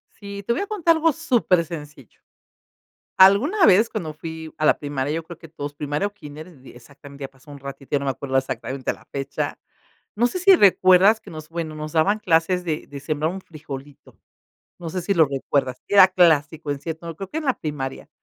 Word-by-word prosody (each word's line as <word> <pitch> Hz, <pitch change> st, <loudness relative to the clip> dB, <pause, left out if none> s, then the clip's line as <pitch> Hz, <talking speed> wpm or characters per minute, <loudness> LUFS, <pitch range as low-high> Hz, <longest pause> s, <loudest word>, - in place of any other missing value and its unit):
Sí, 200 Hz, -1 st, -8 dB
te 235 Hz, -, +1 dB
voy -, -, -2 dB
a 405 Hz, -, -3 dB
contar 345 Hz, -6 st, +2 dB
algo 320 Hz, 0 st, +3 dB
supersencillo, 170 Hz, -, -1 dB, 1.0 s
alguna 230 Hz, -, +6 dB
vez 210 Hz, +3 st, +5 dB
cuando 160 Hz, -8 st, -5 dB
fui 160 Hz, 0 st, -8 dB
a 155 Hz, -, -3 dB
la -, -, +4 dB
primaria, 145 Hz, -1 st, -3 dB
yo 165 Hz, -, -2 dB
creo 165 Hz, 0 st, -11 dB
que 165 Hz, -, -13 dB
todos 145 Hz, -2 st, -7 dB
primaria 150 Hz, +6 st, -2 dB
o 205 Hz, -, -7 dB
kínder, 150 Hz, -2 st, -10 dB, 0.2 s
exactamente 140 Hz, +3 st, -14 dB
ya -, -, -5 dB
pasó 135 Hz, +2 st, -20 dB
un 145 Hz, -, -10 dB
ratito, 140 Hz, 0 st, -10 dB
ya 145 Hz, -, +3 dB
no 140 Hz, -, -5 dB
me -, -, +1 dB
acuerdo 135 Hz, 0 st, -3 dB
exactamente 130 Hz, 0 st, -3 dB
la -, -, -15 dB
fecha, 140 Hz, 0 st, -4 dB, 0.6 s
no 240 Hz, +3 st, +3 dB
sé 365 Hz, -, -4 dB
si 385 Hz, +1 st, +7 dB
recuerdas 195 Hz, -, +5 dB
que 195 Hz, -, -13 dB
nos 155 Hz, -1 st, -9 dB
bueno, 165 Hz, -2 st, -4 dB
nos 155 Hz, 0 st, -7 dB
daban 195 Hz, +7 st, +2 dB
clases 180 Hz, 0 st, +1 dB
de 155 Hz, -2 st, -3 dB
de 140 Hz, -1 st, -8 dB
sembrar 155 Hz, +3 st, -2 dB
un 190 Hz, -, -6 dB
frijolito, 145 Hz, -4 st, -11 dB, 0.6 s
no 170 Hz, -2 st, -6 dB
sé 185 Hz, +2 st, -3 dB
si 200 Hz, +4 st, 0 dB
lo 160 Hz, -, +6 dB
recuerdas, 135 Hz, -2 st, -2 dB
era 200 Hz, -2 st, +7 dB
clásico 160 Hz, -4 st, +2 dB
en 140 Hz, -, -3 dB
cierto, 165 Hz, +1 st, -6 dB
creo 195 Hz, +1 st, -7 dB
que 310 Hz, -, -5 dB
en 320 Hz, -, -4 dB
la 265 Hz, -, +1 dB
primaria, 140 Hz, -4 st, -5 dB
160 Hz, 205 wpm, -22 LUFS, 145-195 Hz, 1.0 s, si